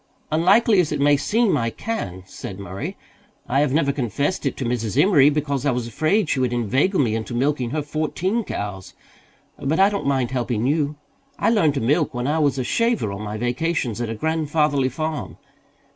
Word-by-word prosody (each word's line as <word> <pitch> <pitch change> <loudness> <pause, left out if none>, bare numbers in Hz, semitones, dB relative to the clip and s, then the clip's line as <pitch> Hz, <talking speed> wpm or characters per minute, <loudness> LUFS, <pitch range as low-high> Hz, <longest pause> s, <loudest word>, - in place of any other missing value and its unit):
"Unlikely 195 +6 +4
as 170 -4 +1
it 150 - -1
may 145 +1 +5
seem, 215 +8 +2
I 115 -1 0
can," 95 - -5
said 95 0 -8
Murray. 95 0 -6 0.5
"I 135 +3 +1
have 145 -2 +2
never 140 -1 +2
confessed 140 - -1
it - - -3
to 130 - -3
Mrs. 115 -4 -1
Emory, 150 -8 +6
because 140 -3 -1
I 145 - +2
was 125 -2 -1
afraid 155 - +1
she 140 - 0
would 125 -2 +1
inveigle 130 - +1
me 120 -6 +2
into 115 +2 -3
milking 130 -1 0
her 150 +3 -2
fourteen 160 +9 -1
cows. 100 - -6 0.6
But 150 +5 0
I 195 +1 +5
don't 200 -8 -2
mind 130 -3 +1
helping 120 -3 -1
you. 150 +1 +1 0.4
I - - +2
learned 160 -10 +3
to 135 - -1
milk 145 +4 +1
when 120 0 -2
I 150 +3 +1
was 145 -3 +2
a 130 - -1
shaver 230 - 0
on 100 +1 -6
my 105 0 -4
vacations 120 0 -1
at 120 - -2
a 115 - -3
grandfatherly 150 -1 +1
farm. 155 +3 -4
140 Hz, 195 wpm, -22 LUFS, 120-160 Hz, 0.6 s, Emory